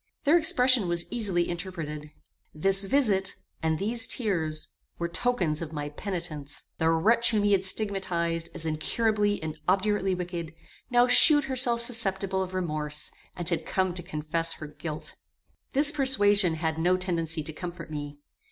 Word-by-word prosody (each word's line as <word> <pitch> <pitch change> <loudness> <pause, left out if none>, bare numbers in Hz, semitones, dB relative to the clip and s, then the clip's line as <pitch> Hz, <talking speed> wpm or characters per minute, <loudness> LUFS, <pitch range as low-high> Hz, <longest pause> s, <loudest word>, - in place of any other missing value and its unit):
Their 300 +3 +4
expression 255 - +4
was 170 0 0
easily 195 -7 0
interpreted. 165 -4 -5 0.5
This 195 +5 +1
visit, 195 -6 +1 0.3
and 160 -1 0
these 225 +4 +2
tears, 160 -9 -1 0.3
were 170 - -2
tokens 175 -5 0
of 160 -1 -6
my 145 -1 -4
penitence. 155 -4 -6 0.2
The 160 0 +2
wretch 220 +9 +3
whom 215 -3 +1
he 205 - +2
had 195 -2 +3
stigmatized 180 -5 -1
as 165 - +1
incurably 205 +6 0
and 155 -1 -5
obdurately 195 0 +1
wicked, 175 -2 -5 0.3
now 245 0 +5
shewed 290 +4 +7
herself 250 -3 +1
susceptible 195 -5 0
of 185 0 -4
remorse, 150 -4 0 0.2
and 175 -2 -5
had 170 -1 +1
come 185 -1 0
to 175 - -1
confess 165 0 -2
her 155 - -8
guilt. 150 +1 -7 0.6
This 290 +2 +5
persuasion 205 - +2
had 160 0 -2
no 180 +2 +3
tendency 165 -3 -2
to 155 +1 -5
comfort 170 0 -7
me. 145 -1 -6
180 Hz, 150 wpm, -27 LUFS, 160-210 Hz, 0.6 s, shewed